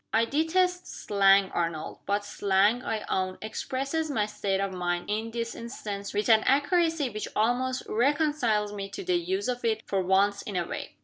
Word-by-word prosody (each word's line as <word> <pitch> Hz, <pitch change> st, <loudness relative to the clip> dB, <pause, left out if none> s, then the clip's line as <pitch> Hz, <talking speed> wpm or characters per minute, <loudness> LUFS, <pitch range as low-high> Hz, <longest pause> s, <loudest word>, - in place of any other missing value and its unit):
"I 225 Hz, +1 st, +3 dB
detest 355 Hz, +7 st, +1 dB
slang, 195 Hz, -1 st, +3 dB
Arnold. 165 Hz, -2 st, -3 dB
But 205 Hz, +1 st, 0 dB
slang, 205 Hz, +4 st, +2 dB
I 220 Hz, -1 st, -3 dB
own, 185 Hz, 0 st, -1 dB
expresses 275 Hz, +8 st, -3 dB
my 220 Hz, -7 st, +1 dB
state 200 Hz, -2 st, -2 dB
of 195 Hz, -1 st, -2 dB
mind, 175 Hz, +1 st, -2 dB
in 220 Hz, +2 st, -1 dB
this 230 Hz, 0 st, -3 dB
instance, 205 Hz, -4 st, -6 dB
with 205 Hz, +1 st, -1 dB
an 220 Hz, -2 st, +6 dB
accuracy 300 Hz, 0 st, +2 dB
which 215 Hz, 0 st, -4 dB
almost 250 Hz, +4 st, +1 dB
reconciles 245 Hz, -5 st, +1 dB
me 195 Hz, -1 st, -5 dB
to 295 Hz, -, -7 dB
the 365 Hz, 0 st, 0 dB
use 375 Hz, +3 st, -2 dB
of 245 Hz, -1 st, -2 dB
it 220 Hz, -1 st, 0 dB
for 195 Hz, -1 st, 0 dB
once 195 Hz, +2 st, +2 dB
in 205 Hz, -, -6 dB
a 175 Hz, -1 st, 0 dB
way." -, -, -6 dB
220 Hz, 180 wpm, -28 LUFS, 200-275 Hz, -, an